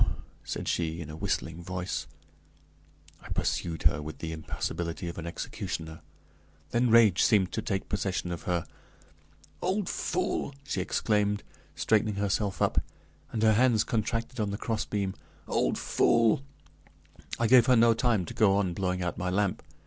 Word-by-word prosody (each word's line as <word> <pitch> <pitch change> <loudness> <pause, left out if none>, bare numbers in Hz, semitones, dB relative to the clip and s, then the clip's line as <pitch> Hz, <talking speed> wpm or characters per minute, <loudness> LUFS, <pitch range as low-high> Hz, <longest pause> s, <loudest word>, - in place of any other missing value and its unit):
said - - -4
she, 80 -1 -1
in 80 -2 -6
a - - -7
whistling 85 -2 -2
voice. 90 -3 -3 1.1
I - - -12
pursued 80 -3 -1
her 75 - +3
with 75 +1 -7
the 80 - -5
impassability 85 +2 -4
of 85 - -5
an 85 - -5
executioner. 80 -1 -5 0.7
Then 120 +1 +2
rage 110 -5 +6
seemed 95 -4 +4
to 110 - -2
take 95 -3 -2
possession 95 -3 -2
of 85 - -4
her. 85 -2 0 1.0
"Old 190 +1 0
fool!" 175 -5 -1
she 140 - -2
exclaimed, 105 -1 +1 0.3
straightening 110 -1 +2
herself 100 0 0
up, - - +2 0.5
and 110 - -1
her 110 -1 +6
hands 115 -1 +4
contracted 115 +2 -2
on 105 -2 0
the 100 - -3
crossbeam. 105 -3 -2 0.3
"Old - - +1
fool!" 115 +4 +3 1.0
I 115 - +1
gave 125 +1 +6
her 130 - +6
no 115 0 +6
time 115 -5 +1
to - - -7
go 100 -3 +4
on 95 -3 0
blowing 90 -1 -1
out 85 - -3
my 90 0 -1
lamp. 100 0 0
100 Hz, 155 wpm, -29 LUFS, 85-115 Hz, 1.1 s, rage